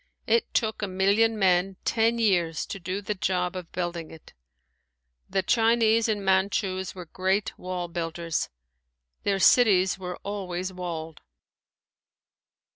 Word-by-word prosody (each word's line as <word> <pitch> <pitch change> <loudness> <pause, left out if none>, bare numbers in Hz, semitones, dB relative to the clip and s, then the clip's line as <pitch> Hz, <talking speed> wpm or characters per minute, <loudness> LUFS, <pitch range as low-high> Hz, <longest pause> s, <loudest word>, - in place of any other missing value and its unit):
It 470 - +1
took 220 -2 0
a 205 - -1
million 200 +4 +2
men 190 -1 +2
ten 230 0 +2
years 175 -8 +1
to 195 - -6
do 185 +3 -4
the 210 - -1
job 180 -2 -1
of 180 -3 -7
building 175 -2 -4
it. 160 - -14 1.0
The 190 0 0
Chinese 225 +1 +3
and 205 -2 -1
Manchus 190 0 0
were 180 -2 -8
great 190 +4 -1
wall 180 -1 -4
builders. 165 -1 -3 0.7
Their 200 -1 +1
cities 190 -3 +4
were 180 -1 -5
always 185 -2 -4
walled. 165 -3 -6
190 Hz, 125 wpm, -26 LUFS, 180-205 Hz, 1.0 s, cities